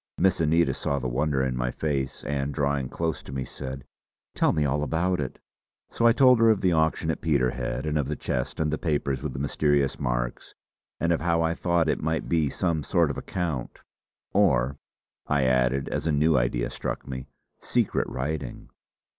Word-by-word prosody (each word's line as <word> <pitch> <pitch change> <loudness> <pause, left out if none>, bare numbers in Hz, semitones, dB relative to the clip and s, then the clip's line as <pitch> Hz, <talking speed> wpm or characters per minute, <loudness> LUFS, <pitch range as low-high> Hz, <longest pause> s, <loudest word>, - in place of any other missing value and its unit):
Miss 95 -2 +3
Anita 80 +2 +3
saw 70 - -1
the 65 -2 -2
wonder 70 +2 0
in 65 -1 -1
my 60 0 -1
face 70 -2 -2
and 70 -1 -2
drawing 70 -2 0
close 80 -3 -2
to - - -11
me 65 -1 -3
said: 65 0 -7 0.5
"Tell - - +3
me 75 -1 +1
all 70 +1 0
about 85 +4 0
it!" 65 - -5 0.5
So 115 - +3
I - - +7
told 125 -1 +6
her 115 0 +6
of 110 -3 +3
the 90 - +3
auction 80 0 +1
at 80 - -5
Peterhead 65 -4 0
and 75 0 0
of 70 - -1
the 75 - -2
chest 60 -3 -3
and 75 -1 +1
the 80 - -2
papers 70 -5 -1
with 75 -3 -4
the - - -6
mysterious 70 0 +1
marks, - - -3 0.4
and 85 - +1
of 80 - -1
how 85 0 +2
I 80 0 +1
thought 85 -2 +1
it - - 0
might 80 +1 -1
be 80 -4 +2
some 85 +1 0
sort 85 -1 +2
of - - -6
account 80 -9 -4 0.5
"or," 65 +3 +2 0.5
I 75 -2 +2
added 65 +1 +2
as - - -2
a - - +2
new 75 +2 +3
idea - - 0
struck - - -4
me 65 0 -6 0.3
"secret - - 0
writing." 75 +4 -4
75 Hz, 195 wpm, -26 LUFS, 65-80 Hz, 0.5 s, I